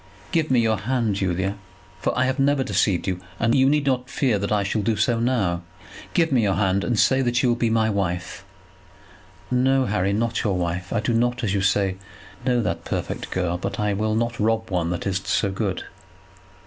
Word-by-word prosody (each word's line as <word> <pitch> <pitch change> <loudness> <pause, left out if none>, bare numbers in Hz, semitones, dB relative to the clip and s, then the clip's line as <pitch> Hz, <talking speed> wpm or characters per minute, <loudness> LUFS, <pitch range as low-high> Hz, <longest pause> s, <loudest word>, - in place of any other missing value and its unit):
Give 160 -2 +1
me 130 -2 +4
your 110 -2 +2
hand, 115 0 0
Julia, 95 +1 -1 0.4
for 85 - -1
I 130 - +3
have 130 +2 -1
never 140 0 +3
deceived 100 -7 +1
you, 90 -1 -2 0.2
and 115 +1 +2
you 135 0 +4
need 150 0 +2
not 125 -2 0
fear 125 -7 +1
that 100 +1 -3
I 105 -1 +2
shall 100 +2 -1
do 110 +2 +1
so 115 +3 +1
now. 110 -8 0 0.5
Give 165 -3 +3
me 130 -3 +3
your 100 -3 +1
hand, 95 -1 +1
and 120 - 0
say 130 +5 +4
that 120 -1 +1
you 125 - +3
will 120 - +3
be 120 -1 0
my 110 -1 +2
wife." 90 -4 -2 1.1
"No, 130 +1 +3
Harry; 100 -3 0
not 115 +3 0
your 100 -4 +1
wife. 90 0 -3
I 115 - 0
do 115 +2 0
not, 120 +2 +1
as 100 -4 0
you 100 - +1
say, 95 -1 +1 0.5
know 125 -2 +1
that - - -2
perfect - - -4
girl, 90 -1 -1
but - - -4
I 105 -1 +1
will 110 +2 0
not 115 +1 -1
rob 110 0 0
one 85 -2 0
that 90 -1 -3
is 95 -1 -1
so 100 - 0
good." 95 -1 -2
110 Hz, 210 wpm, -23 LUFS, 95-125 Hz, 1.1 s, me